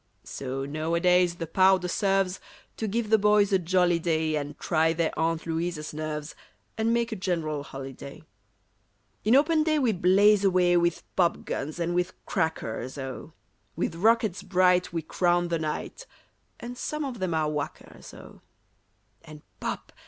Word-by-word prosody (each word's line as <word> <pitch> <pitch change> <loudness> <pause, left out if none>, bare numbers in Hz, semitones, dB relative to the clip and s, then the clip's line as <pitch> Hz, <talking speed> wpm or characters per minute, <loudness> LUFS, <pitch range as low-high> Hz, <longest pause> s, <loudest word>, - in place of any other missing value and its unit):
So 135 0 -5
nowadays 170 +4 +2
the 170 - -4
powder 185 +2 +3
serves 195 0 0 0.4
To 220 - -2
give 220 +1 -2
the 220 - +6
boys 210 -1 +3
a 190 - +4
jolly 175 0 +2
day 160 -2 0
And 145 -1 -4
try 160 -1 +1
their 165 -1 0
Aunt 165 0 -1
Louisa's 165 -2 -3
nerves, 155 0 -5 0.4
And 220 +1 0
make 235 0 0
a - - -2
general 165 -6 -2
holiday. 135 0 -9 1.0
In 220 +4 +4
open 310 +3 +4
day 310 0 +2
we 255 -6 +2
blaze 200 +2 +4
away 180 -2 +3
With 170 -1 +1
popguns 165 -4 -1
and 170 0 -1
with 180 0 -1
crackers, 130 -5 -2
oh! 135 +3 -7 0.4
With 170 - -2
rockets 215 +1 +2
bright 180 -2 +2
we 165 -1 -3
crown 175 +2 +1
the 165 -1 0
night, 155 - -5 0.5
(And 240 +1 -7
some 300 -1 -3
of 250 -5 -6
them 185 -3 -1
are 155 -1 0
whackers, 150 -1 -6
oh!) - - -14 0.8
And 150 -1 -13 0.2
"pop!" - - -5
175 Hz, 150 wpm, -27 LUFS, 155-195 Hz, 1.0 s, the